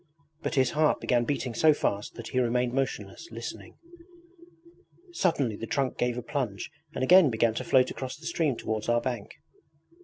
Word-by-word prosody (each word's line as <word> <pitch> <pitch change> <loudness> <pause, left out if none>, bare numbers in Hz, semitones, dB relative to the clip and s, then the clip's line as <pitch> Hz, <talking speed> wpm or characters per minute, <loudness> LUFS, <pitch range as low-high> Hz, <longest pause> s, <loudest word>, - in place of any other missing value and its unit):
But - - -2
his 130 -2 +3
heart 155 0 +2
began 120 -1 +1
beating 130 -2 -2
so 155 +4 +5
fast 100 -7 -2
that - - -7
he 130 - 0
remained 125 0 +1
motionless, 130 - -3
listening. - - -8 1.3
Suddenly 145 - 0
the 115 - -6
trunk 135 +1 -1
gave 120 0 0
a 125 - -4
plunge 120 -7 -3 0.2
and - - -1
again 180 +2 +7
began 115 -1 +2
to - - -3
float 130 -1 +3
across 130 -1 -6
the 160 - -14
stream 160 -5 0
towards 110 0 -3
our 120 0 +4
bank. 120 -4 -4
125 Hz, 175 wpm, -28 LUFS, 115-145 Hz, 1.3 s, again